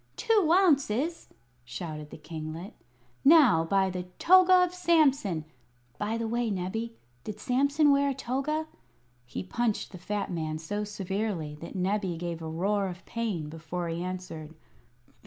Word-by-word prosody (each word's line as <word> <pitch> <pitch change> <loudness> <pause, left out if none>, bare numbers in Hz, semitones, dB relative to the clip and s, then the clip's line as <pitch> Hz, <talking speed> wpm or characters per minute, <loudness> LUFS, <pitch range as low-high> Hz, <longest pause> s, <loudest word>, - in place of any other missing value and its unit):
"Two 420 -8 +2
ounces!" 320 - +2 0.4
shouted 150 +5 -6
the - - -10
kinglet. 160 +3 -7 0.5
"Now, 275 - +7
by 190 +3 +2
the 180 0 -5
toga 370 0 +6
of 360 0 -1
Samson 280 - +2 0.5
by 215 +2 -1
the 230 0 -2
way, 235 +1 0
Nebbie, 215 +5 -3 0.3
did 210 -1 -6
Samson 280 +4 +3
wear 280 0 +3
a 275 - -2
toga?" 275 +5 -2 0.6
He - - -5
punched 225 +3 -1
the 185 - -10
fat 205 +2 -3
man 155 -2 -2
so 205 +7 -3
severely 195 -5 -3
that 170 - -8
Nebbie 190 -1 -1
gave 170 -1 -4
a 160 - -5
roar 195 +5 0
of 180 0 -8
pain 215 -10 -3
before 165 +2 -5
he 165 +1 -3
answered. 180 -4 -6
205 Hz, 145 wpm, -28 LUFS, 170-270 Hz, 0.6 s, Now